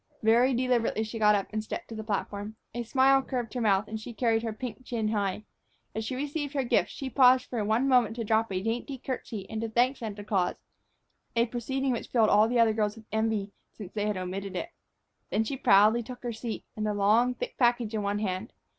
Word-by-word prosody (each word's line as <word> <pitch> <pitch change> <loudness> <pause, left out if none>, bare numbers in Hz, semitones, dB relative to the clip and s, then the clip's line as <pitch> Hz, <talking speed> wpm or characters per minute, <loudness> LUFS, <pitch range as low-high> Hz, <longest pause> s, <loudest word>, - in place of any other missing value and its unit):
Very 240 +4 +4
deliberately 240 -3 +1
she 225 +1 -6
got 210 -1 +5
up 200 - 0
and 215 0 -1
stepped 340 +10 -6
to 225 - -7
the 220 - -5
platform. 205 0 -3 0.2
A 240 - -3
smile 270 +3 +4
curved 245 -4 -4
her 250 - -2
mouth, 205 -1 +2
and 220 0 -5
she 230 +1 -9
carried 225 -2 +2
her 225 -1 -3
pink 250 +3 -7
chin 225 -3 -2
high. 205 -1 -1 0.5
As 220 - -3
she 240 +4 -3
received 290 +1 -3
her 275 - +1
gift, 240 - +2
she 270 - -6
paused 255 -1 +5
for 235 -4 -3
one 220 +6 +1
moment 245 -4 +3
to 235 - -3
drop 220 0 +1
a 185 0 -2
dainty 240 +5 -2
curtsy 230 -6 -5
and 220 0 -4
to 230 - -2
thank 245 +4 +2
Santa 210 -3 -6
Claus, 195 -4 0 0.8
a 230 0 +4
proceeding 260 +3 -2
which 235 - -3
filled 225 -3 +3
all 210 +1 +5
the 240 +1 +1
other 225 -1 +5
girls 210 -1 0
with 225 -1 -14
envy, 220 -2 0 0.2
since 205 -4 -10
they 210 -1 -1
had 210 -2 -1
omitted 190 +1 -4
it. 335 - -4 0.6
Then 220 - +1
she 245 +5 -3
proudly 215 -1 +5
took 245 +2 -9
her 240 -1 -3
seat, 225 0 -5
the 215 -1 -1
long, 220 +5 +3
thick - - -5
package 240 -3 +2
in 215 - -1
one 200 0 -1
hand. 195 +1 -3
225 Hz, 225 wpm, -28 LUFS, 210-245 Hz, 0.8 s, got